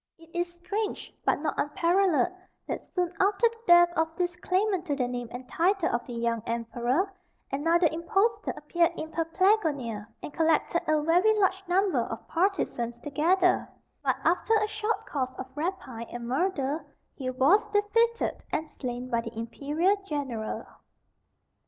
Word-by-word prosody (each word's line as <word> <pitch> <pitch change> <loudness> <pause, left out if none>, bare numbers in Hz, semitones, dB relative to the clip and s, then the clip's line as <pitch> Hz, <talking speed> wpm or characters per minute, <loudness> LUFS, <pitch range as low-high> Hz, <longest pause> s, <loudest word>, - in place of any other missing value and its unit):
It 330 0 -18
is 345 0 -1
strange, 405 +5 -4
but - - +2
not 305 - 0
unparalleled, 350 +2 +2 0.3
that - - -3
soon 355 -2 -2
after 405 +4 +4
the 460 0 -16
death 345 0 +7
of 320 0 +2
this 355 -1 -1
claimant 375 +1 0
to 290 - 0
the 255 -3 0
name 245 -1 -4
and 250 +1 -8
title 360 +3 +2
of 240 - 0
the 245 - -6
young 230 -1 -1
Emperor, 240 - -1 0.4
another 330 +5 +3
impostor 390 +7 0
appeared 335 +3 +1
in 315 0 -5
Paphlagonia, 325 - +1 0.2
and 295 - -6
collected 325 +1 +2
a 310 -1 +2
very 360 +7 +4
large 380 -1 +2
number 380 +2 +2
of - - -4
partisans 325 - 0
together; 330 +8 +2 0.3
but - - +2
after 360 +6 +3
a 425 -1 +3
short 435 +1 -2
course 260 -3 -3
of 260 - -5
rapine 295 -8 -4
and 240 -1 -6
murder, 290 +1 0 0.3
he 260 -2 -4
was 295 - +4
defeated 440 +3 +1
and 315 - -1
slain 250 -3 -5
by 235 -2 0
the 230 -1 -8
imperial 295 - 0
general. 265 - -3
330 Hz, 150 wpm, -28 LUFS, 260-380 Hz, 0.4 s, death